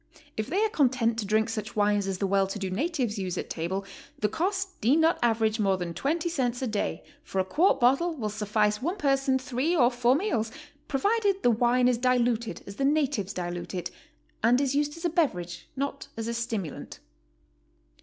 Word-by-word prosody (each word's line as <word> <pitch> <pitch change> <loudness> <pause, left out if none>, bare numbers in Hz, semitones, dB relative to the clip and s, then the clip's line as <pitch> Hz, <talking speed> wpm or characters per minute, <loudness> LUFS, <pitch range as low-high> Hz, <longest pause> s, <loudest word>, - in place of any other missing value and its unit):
If 215 0 -2
they 385 +10 +1
are - - 0
content 250 - +2
to 205 - -3
drink 220 +2 +2
such 225 +1 -5
wines 205 -1 +2
as 190 -1 -2
the 195 - -1
well 195 0 +2
to 195 - -5
do 190 -2 -3
natives 245 - -1
use 185 -2 -3
at - - -4
table, 190 +4 -3 0.3
the 210 - 0
cost 385 - -1
need 250 +6 +5
not 325 +1 +3
average 225 -1 +2
more 195 -2 +2
than 175 -2 -4
20 320 - -1
cents 255 -6 -1
a - - +1
day, 215 -4 -2 0.2
for 300 -11 -7
a 190 - +2
quart 315 - +3
bottle 275 +8 +3
will 220 -7 -3
suffice 210 0 0
one 345 +8 -1
person 275 -3 +2
three 265 +5 -1
or 250 -6 +4
four 245 +1 +3
meals, 275 - -1 0.4
provided 400 - +1
the 245 - +5
wine 245 +2 +3
is 245 -2 +2
diluted 240 -2 +1
as 200 - -9
the 275 - -1
natives 275 -9 +1
dilute 175 -1 -5
it, 175 -1 -4 0.5
and 240 +3 +4
is 275 -1 +1
used 295 +2 0
as 335 - -6
a - - +3
beverage, 180 - -1
not 275 +1 -3
as 225 0 -3
a 235 - -2
stimulant. 225 -8 -4
240 Hz, 200 wpm, -27 LUFS, 210-285 Hz, 0.5 s, need